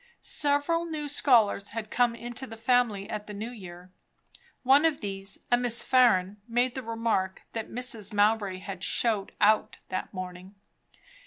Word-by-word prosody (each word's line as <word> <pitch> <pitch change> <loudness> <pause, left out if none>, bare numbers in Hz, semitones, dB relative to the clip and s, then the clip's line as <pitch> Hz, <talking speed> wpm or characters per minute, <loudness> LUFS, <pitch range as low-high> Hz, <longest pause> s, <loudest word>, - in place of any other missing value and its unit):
Several 295 +4 +1
new 310 -3 -4
scholars 230 -8 +3
had 215 -1 -5
come 240 -2 +2
into 240 +2 -6
the 225 - -10
family 225 -4 +1
at 210 -1 -5
the 210 - -7
New 220 +4 -5
Year. 180 -5 -11 0.7
One 270 +4 +5
of 320 -3 +2
these, 195 -1 -5
a 245 - +6
Miss 240 -1 0
Farren, 210 -6 +3
made 245 +1 +1
the 260 - -4
remark 225 -5 -2
that 225 -1 -4
Mrs. 230 -4 -3
Mowbray 205 -2 +2
had 190 -1 -7
"showed 215 -5 +1
out" 215 +1 +3
that 185 - -4
morning. 185 +1 -8
225 Hz, 155 wpm, -28 LUFS, 195-245 Hz, 0.7 s, a